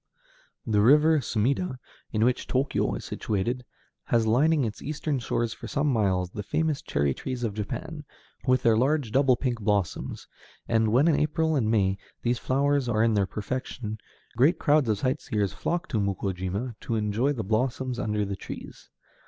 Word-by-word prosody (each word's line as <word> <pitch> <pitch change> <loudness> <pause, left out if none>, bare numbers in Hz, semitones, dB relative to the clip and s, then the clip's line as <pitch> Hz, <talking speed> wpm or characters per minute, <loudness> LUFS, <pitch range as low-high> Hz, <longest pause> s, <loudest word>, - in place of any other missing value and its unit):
The 105 -3 +2
river 150 +7 +6
Sumida, 130 - 0 0.3
on 110 0 +1
which 125 +1 0
Tōkyō 135 +2 0
is - - -9
situated, 115 +5 -2 0.4
has 115 -1 +2
lining 145 +7 +3
its 110 -1 -5
eastern 150 -1 -2
shore 120 -1 -1
for 110 - -8
some 145 -1 +1
miles 95 -5 +1
the 105 - -5
famous 155 - -1
cherry 70 -1 0
trees 125 - -5
of 110 -3 -1
Japan, 150 +9 -5 0.4
with 130 0 +3
their 115 -1 +5
large, 135 0 +1
double 135 0 +4
pink 120 -2 -2
blossoms, 100 -4 -1 0.4
and 110 -1 +2
when, 130 +7 +4
in 160 - +3
April 160 +1 +1
and 115 -6 +1
May, 100 -3 +2 0.2
these 120 0 +1
flowers 140 -1 +1
are 110 -2 +2
in 115 -1 +3
their 100 -2 +2
perfection, 110 0 -4 0.4
great 145 +9 +4
crowds 150 -6 +3
of 105 - +2
sightseers 120 -6 -1
flock 175 +1 -2
to 110 - 0
Mukōjima 100 +3 -2
to 115 - -3
enjoy 110 +5 +1
the 120 -6 -3
blossoms 125 +4 -1
under 105 -1 0
the 100 0 -3
trees. - - -9
120 Hz, 170 wpm, -27 LUFS, 105-140 Hz, 0.4 s, river